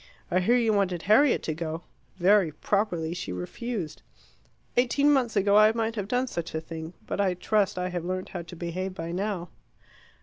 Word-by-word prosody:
I 185 Hz, -, +3 dB
hear 235 Hz, +7 st, +3 dB
you 230 Hz, -3 st, +2 dB
wanted 185 Hz, -4 st, 0 dB
Harriet 240 Hz, +8 st, +4 dB
to 160 Hz, -, -1 dB
go. 160 Hz, +1 st, -4 dB, 0.3 s
Very 190 Hz, -2 st, +4 dB
properly 175 Hz, -3 st, -1 dB
she 180 Hz, -, -5 dB
refused. 160 Hz, -, -5 dB, 0.7 s
Eighteen 280 Hz, +4 st, +4 dB
months 250 Hz, -5 st, +1 dB
ago 200 Hz, 0 st, +3 dB
I 215 Hz, +1 st, +7 dB
might 225 Hz, 0 st, -1 dB
have 205 Hz, -3 st, -3 dB
done 250 Hz, +3 st, +1 dB
such 170 Hz, -10 st, -5 dB
a -, -, 0 dB
thing. 160 Hz, +1 st, -7 dB
But -, -, -1 dB
I 185 Hz, -2 st, +1 dB
trust 200 Hz, +1 st, +1 dB
I 180 Hz, 0 st, -1 dB
have 175 Hz, -2 st, -3 dB
learnt 185 Hz, +1 st, -3 dB
how 180 Hz, -, -5 dB
to 170 Hz, +1 st, -10 dB
behave 180 Hz, +2 st, -4 dB
by 165 Hz, -1 st, -5 dB
now." 185 Hz, -1 st, -2 dB
185 Hz, 190 wpm, -27 LUFS, 170-215 Hz, 0.7 s, I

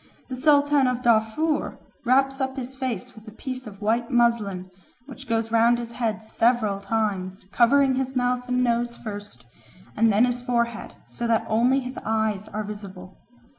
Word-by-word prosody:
The 260 Hz, -, -4 dB
Sultan 285 Hz, 0 st, +4 dB
of 250 Hz, 0 st, -2 dB
Darfur 235 Hz, +7 st, +1 dB, 0.3 s
wraps 270 Hz, +2 st, +2 dB
up 265 Hz, 0 st, -2 dB
his 260 Hz, 0 st, -6 dB
face 255 Hz, -7 st, -4 dB
with 220 Hz, 0 st, -16 dB
a -, -, -8 dB
piece 255 Hz, 0 st, -6 dB
of 205 Hz, 0 st, -10 dB
white 230 Hz, +2 st, +1 dB
muslin, 215 Hz, -7 st, +1 dB, 0.3 s
which 270 Hz, -1 st, -11 dB
goes 225 Hz, 0 st, 0 dB
round 230 Hz, +1 st, +4 dB
his 235 Hz, -1 st, -6 dB
head 225 Hz, -3 st, -2 dB
several 220 Hz, -2 st, +1 dB
times, 195 Hz, -3 st, -2 dB
covering 265 Hz, +3 st, +4 dB
his 265 Hz, 0 st, -2 dB
mouth 250 Hz, 0 st, 0 dB
and 250 Hz, 0 st, +1 dB
nose 235 Hz, 0 st, 0 dB
first, 205 Hz, -, -8 dB, 0.5 s
and 225 Hz, +1 st, +4 dB
then 210 Hz, +4 st, +4 dB
his 245 Hz, 0 st, -2 dB
forehead, 235 Hz, -2 st, -2 dB
so 235 Hz, -, -4 dB
that 225 Hz, -1 st, +1 dB
only 245 Hz, +5 st, +2 dB
his 255 Hz, 0 st, -6 dB
eyes 220 Hz, -2 st, -1 dB
are 215 Hz, 0 st, -4 dB
visible. 200 Hz, -3 st, -9 dB
235 Hz, 170 wpm, -24 LUFS, 215-255 Hz, 0.5 s, Sultan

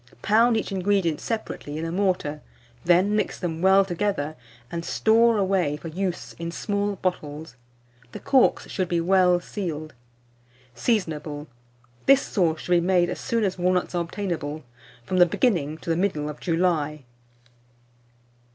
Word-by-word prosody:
Pound 225 Hz, +2 st, +4 dB
each 220 Hz, -, -3 dB
ingredient 190 Hz, -4 st, 0 dB
separately 215 Hz, -9 st, -4 dB
in 160 Hz, -, -3 dB
a 165 Hz, -, -3 dB
mortar, 180 Hz, -6 st, -1 dB, 0.4 s
then 180 Hz, +4 st, +3 dB
mix 215 Hz, -, -1 dB
them 165 Hz, -3 st, -3 dB
well 190 Hz, +1 st, +5 dB
together, 175 Hz, -5 st, -2 dB, 0.4 s
and 170 Hz, 0 st, -4 dB
store 225 Hz, +5 st, +3 dB
away 185 Hz, -7 st, +1 dB
for 165 Hz, -, -8 dB
use 180 Hz, +1 st, -3 dB
in 170 Hz, 0 st, -4 dB
small 205 Hz, +2 st, -2 dB
bottles. 155 Hz, -7 st, -4 dB, 0.6 s
The -, -, -7 dB
corks 265 Hz, -2 st, +3 dB
should 185 Hz, -3 st, -2 dB
be 170 Hz, -, +1 dB
well 180 Hz, 0 st, +4 dB
sealed. 160 Hz, -5 st, -5 dB, 0.8 s
Seasonable. 150 Hz, -, -2 dB, 0.6 s
This 275 Hz, 0 st, +6 dB
sauce 165 Hz, -6 st, 0 dB
should -, -, -6 dB
be 175 Hz, -1 st, +5 dB
made 175 Hz, 0 st, +2 dB
as -, -, -5 dB
soon 230 Hz, -1 st, -1 dB
as 190 Hz, -2 st, -1 dB
walnuts 180 Hz, +1 st, +1 dB
are 175 Hz, -, 0 dB
obtainable, 165 Hz, -5 st, -4 dB, 0.4 s
from 185 Hz, -, -1 dB
the 175 Hz, -1 st, +7 dB
beginning 165 Hz, -, 0 dB
to 165 Hz, -, -4 dB
the -, -, +2 dB
middle 165 Hz, -5 st, -1 dB
of 150 Hz, -, -8 dB
July. 165 Hz, -4 st, 0 dB
180 Hz, 150 wpm, -25 LUFS, 160-195 Hz, 0.8 s, the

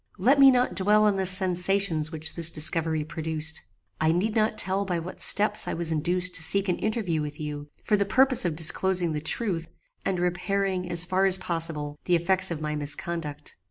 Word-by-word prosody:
"Let 255 Hz, +9 st, +2 dB
me 275 Hz, -1 st, +8 dB
not 250 Hz, -6 st, +1 dB
dwell 205 Hz, +4 st, +2 dB
on 205 Hz, -2 st, +1 dB
the 190 Hz, -1 st, -2 dB
sensations 180 Hz, -3 st, 0 dB
which 160 Hz, 0 st, -3 dB
this 170 Hz, -1 st, +3 dB
discovery 160 Hz, 0 st, 0 dB
produced. 160 Hz, 0 st, -4 dB, 0.4 s
I 160 Hz, -, +1 dB
need 195 Hz, +6 st, -1 dB
not 215 Hz, -1 st, 0 dB
tell 190 Hz, +1 st, 0 dB
by 180 Hz, -3 st, -3 dB
what 170 Hz, +2 st, -8 dB
steps 210 Hz, +1 st, +6 dB
I -, -, -3 dB
was 165 Hz, -1 st, -2 dB
induced 180 Hz, +3 st, -1 dB
to -, -, -1 dB
seek 195 Hz, +5 st, +1 dB
an 180 Hz, -, -2 dB
interview 210 Hz, -8 st, -2 dB
with 150 Hz, 0 st, -7 dB
you, 150 Hz, -1 st, -7 dB
for 210 Hz, -, +1 dB
the 200 Hz, -, 0 dB
purpose 260 Hz, +5 st, +4 dB
of 170 Hz, -4 st, -2 dB
disclosing 175 Hz, +2 st, +2 dB
the 150 Hz, -1 st, -4 dB
truth, 165 Hz, -1 st, -1 dB, 0.3 s
and 185 Hz, -2 st, -2 dB
repairing, 185 Hz, +1 st, -2 dB
as 170 Hz, 0 st, +2 dB
far 190 Hz, +2 st, 0 dB
as 190 Hz, -1 st, +7 dB
possible, 160 Hz, -4 st, -4 dB
the 180 Hz, -, +2 dB
effects 185 Hz, +3 st, 0 dB
of 165 Hz, -3 st, -5 dB
my 150 Hz, 0 st, -4 dB
misconduct. 150 Hz, 0 st, -5 dB
175 Hz, 195 wpm, -25 LUFS, 160-195 Hz, 0.4 s, me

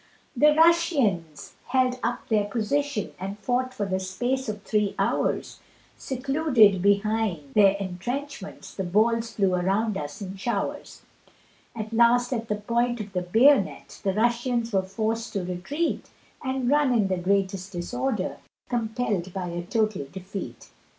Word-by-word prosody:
The 300 Hz, +4 st, +5 dB
Russians 280 Hz, -, +2 dB
held 255 Hz, 0 st, +1 dB
up 240 Hz, +1 st, -2 dB
their 210 Hz, -2 st, +2 dB
position, 235 Hz, +3 st, -1 dB
And 195 Hz, +2 st, -5 dB
fought 250 Hz, +4 st, -1 dB
for 210 Hz, -5 st, -3 dB
the 190 Hz, -1 st, -1 dB
space 245 Hz, +7 st, -2 dB
of 210 Hz, -1 st, -5 dB
three 210 Hz, -3 st, 0 dB
hours, -, -, -1 dB, 0.4 s
Secluded 255 Hz, -, +3 dB
behind 200 Hz, -7 st, +1 dB
their 200 Hz, -2 st, +6 dB
entrenchments, 200 Hz, +5 st, -5 dB
The 190 Hz, -, -3 dB
balls 225 Hz, +5 st, +1 dB
flew 195 Hz, -3 st, +2 dB
around 195 Hz, +4 st, +1 dB
us 145 Hz, 0 st, -6 dB
in 195 Hz, -1 st, -6 dB
showers; 215 Hz, +5 st, -3 dB, 0.7 s
At 220 Hz, 0 st, -5 dB
last 240 Hz, +2 st, +4 dB
at 230 Hz, -2 st, -3 dB
the 210 Hz, -, 0 dB
point 235 Hz, +3 st, 0 dB
of 205 Hz, -2 st, -7 dB
the 180 Hz, -, 0 dB
bayonet, 225 Hz, +4 st, +3 dB
The 195 Hz, -, +1 dB
Russians 235 Hz, +1 st, 0 dB
were 190 Hz, -, +3 dB
forced 220 Hz, +4 st, -3 dB
to 200 Hz, -3 st, -1 dB
retreat, 190 Hz, -, -2 dB, 0.3 s
And 260 Hz, -1 st, -1 dB
run 285 Hz, -1 st, +3 dB
in 210 Hz, -4 st, +3 dB
the 185 Hz, -1 st, 0 dB
greatest 195 Hz, +1 st, 0 dB
disorder, 245 Hz, +10 st, -2 dB, 0.3 s
Compell'd 220 Hz, -6 st, -1 dB
by 180 Hz, -2 st, -3 dB
a 170 Hz, 0 st, -3 dB
total 215 Hz, -, -1 dB
defeat. 190 Hz, +1 st, -8 dB
215 Hz, 145 wpm, -26 LUFS, 190-245 Hz, 0.7 s, their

